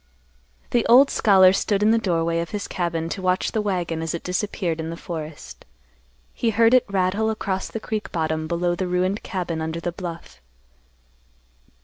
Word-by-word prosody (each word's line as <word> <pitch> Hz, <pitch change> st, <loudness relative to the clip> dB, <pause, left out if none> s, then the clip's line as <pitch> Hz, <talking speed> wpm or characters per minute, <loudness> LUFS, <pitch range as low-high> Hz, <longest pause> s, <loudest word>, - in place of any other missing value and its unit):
The 240 Hz, -2 st, +2 dB
old 265 Hz, +4 st, +7 dB
scholar 190 Hz, -3 st, +5 dB
stood 200 Hz, +1 st, 0 dB
in 215 Hz, -, +5 dB
the 230 Hz, -, +3 dB
doorway 170 Hz, -4 st, 0 dB
of 170 Hz, -, -3 dB
his 205 Hz, -1 st, -4 dB
cabin 170 Hz, -2 st, -2 dB
to 190 Hz, -, -4 dB
watch 185 Hz, 0 st, 0 dB
the 220 Hz, -, 0 dB
wagon 175 Hz, -5 st, -2 dB
as 165 Hz, 0 st, -2 dB
it 170 Hz, -, -6 dB
disappeared 180 Hz, -2 st, -2 dB
in 160 Hz, 0 st, -4 dB
the 165 Hz, -, -6 dB
forest. 155 Hz, -, -8 dB, 0.7 s
He 230 Hz, -, 0 dB
heard 225 Hz, +2 st, +4 dB
it 255 Hz, -, +4 dB
rattle 200 Hz, +3 st, +1 dB
across 195 Hz, -3 st, -2 dB
the 225 Hz, -, -5 dB
creek 215 Hz, -1 st, -4 dB
bottom 160 Hz, -1 st, -1 dB
below 175 Hz, +1 st, 0 dB
the 180 Hz, +1 st, -2 dB
ruined 185 Hz, +3 st, 0 dB
cabin 175 Hz, -5 st, -3 dB
under 160 Hz, +1 st, -3 dB
the 175 Hz, +1 st, -3 dB
bluff. 165 Hz, -, -8 dB
180 Hz, 175 wpm, -23 LUFS, 165-205 Hz, 0.7 s, old